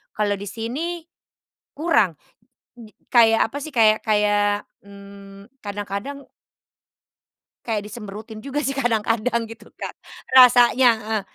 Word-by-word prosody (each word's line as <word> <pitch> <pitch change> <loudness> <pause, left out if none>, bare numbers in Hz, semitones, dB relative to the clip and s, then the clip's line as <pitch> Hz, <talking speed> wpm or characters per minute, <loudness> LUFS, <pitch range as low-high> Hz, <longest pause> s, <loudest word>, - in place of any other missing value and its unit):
Kalau 205 -1 0
di 200 - -8
sini 300 +10 -5 0.8
kurang, 250 - +1 0.6
di 220 -3 -14 0.2
kayak 225 -2 +5
apa 285 - -7
sih 310 - -8
kayak 220 -2 +4
kayak, 205 -1 +1 0.2
mmm, 200 +1 -14
kadang-kadang 205 +7 -6 1.4
kayak 210 -3 -3
dicemberutin 215 +1 -9
juga 280 +1 -3
sih 275 -2 -2
kadang-kadang 230 -2 0
gitu 225 0 -13
Kak, - - -8 0.4
rasanya, 250 0 +7
heeh. 215 -1 -3
220 Hz, 110 wpm, -22 LUFS, 205-245 Hz, 1.4 s, rasanya